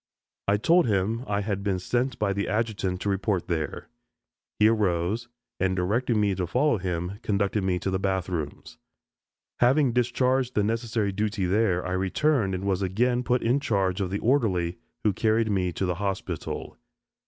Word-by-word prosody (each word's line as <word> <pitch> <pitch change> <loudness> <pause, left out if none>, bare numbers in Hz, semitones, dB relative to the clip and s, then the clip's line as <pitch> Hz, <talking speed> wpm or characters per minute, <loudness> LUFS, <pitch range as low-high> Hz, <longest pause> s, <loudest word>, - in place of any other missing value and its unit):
I 100 +1 +3
told 170 +8 +4
him 110 +3 0
I 100 0 0
had 100 -1 -2
been 100 -2 0
sent 120 +7 -1
by 100 -2 0
the 100 +1 -2
adjutant 105 -4 -1
to 100 - -1
report 95 -1 0
there. 80 -3 -3 0.7
He 105 - +5
arose, 105 +1 +1 0.3
and 95 0 +1
directing 110 +6 +1
me 105 -2 +2
to 90 -1 -2
follow 125 - +2
him, 90 +2 -3
conducted 100 -1 0
me 95 -1 +1
to 95 - -2
the 95 - 0
bath 95 -2 -1
rooms. 75 -8 -5 0.8
Having 130 +1 +4
discharged 125 +1 +1
the 105 - +3
necessary 110 -1 -1
duty 105 0 -1
there, 95 -1 +1
I 90 - -3
returned 95 +3 +1
and 90 - -4
was 95 -1 0
again 120 +7 +1
put 125 0 0
in 125 +5 +2
charge 100 -7 0
of 95 - -1
the 100 - -1
orderly, 100 -9 +1 0.2
who 105 - +3
carried 110 +1 +1
me 90 -3 +1
to 95 - -1
the 90 - 0
hospital. 95 -4 -4
100 Hz, 175 wpm, -26 LUFS, 95-115 Hz, 0.8 s, He